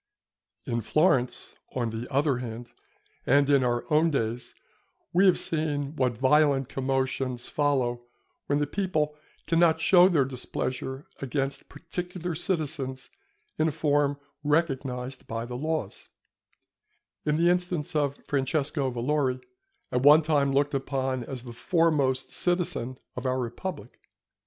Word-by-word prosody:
In 115 0 -1
Florence, 130 - +1 0.2
on 120 -3 -1
the 115 +4 -6
other 140 -2 +2
hand, 120 -1 -7 0.6
and 140 +2 +4
in 140 -2 +5
our 120 -1 0
own 160 +2 +4
days, 120 -4 -2 0.6
we 190 +3 +5
have 185 - +5
seen 150 -2 0
what 125 -5 0
violent 135 0 +3
commotions 130 -2 -1
follow 125 -5 0 0.4
when 145 - +2
the 145 - +1
people 155 -4 -1 0.3
cannot 165 -1 +3
show 180 0 +6
their 150 -7 +3
displeasure 130 +1 -4
against 135 0 -3
particular 175 +3 -5
citizens 150 -6 -2 0.5
in 155 - +3
a - - +1
form 145 -2 +1 0.3
recognized 135 -4 -1
by 115 +1 -3
the 125 - -7
laws, 155 -6 -3 1.1
in 150 0 +1
the 170 +2 +4
instance 180 -2 -1
of 145 -2 +1
Francesco 140 0 0
Valori, 130 +1 0 0.5
at 125 - +1
one 150 +3 +7
time 145 -3 +2
looked 145 +1 +1
upon 135 -2 -1
as 130 -2 -6
the 120 -2 -9
foremost 140 -3 +1
citizen 175 -8 -1 0.2
of 125 +1 -3
our 130 0 +1
republic. 140 +8 -6
140 Hz, 130 wpm, -27 LUFS, 130-155 Hz, 1.1 s, one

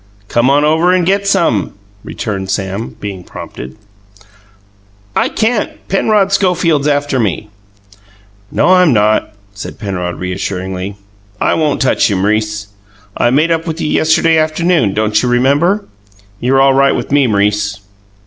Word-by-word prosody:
"Come 120 +2 +2
on 145 +2 +3
over 160 +4 +3
and 180 -2 +2
get 200 +2 +1
some," 170 - +1 0.3
returned 95 -3 -5
Sam, 95 +2 -3
being 100 -3 -6
prompted. 65 -5 -9 1.4
"I - - +1
can't. 220 0 -1 0.2
Penrod 195 0 +2
Schofield's 175 -7 +1
after 145 -2 0
me." 105 -1 -2 1.0
"No, - - +2
I'm 180 -6 +5
not," 105 -1 +1 0.2
said 100 - -8
Penrod 90 -4 -4
reassuringly. 95 +1 -4 0.4
"I - - +1
won't 150 -3 0
touch 130 - +2
you, 100 - 0
M'rice. 105 +1 -1 0.5
I 120 - +2
made 150 +6 +2
up 165 +1 -1
with 160 0 -4
you 155 - -2
yesterday 160 +1 +3
afternoon 155 - +1
don't 110 0 +1
you 125 - 0
remember? 145 +12 +2 0.5
You're 130 +2 +2
all 135 0 +5
right 135 +1 +3
with - - -4
me, 140 -2 +3
M'rice." 105 0 0
130 Hz, 140 wpm, -14 LUFS, 105-165 Hz, 1.4 s, I'm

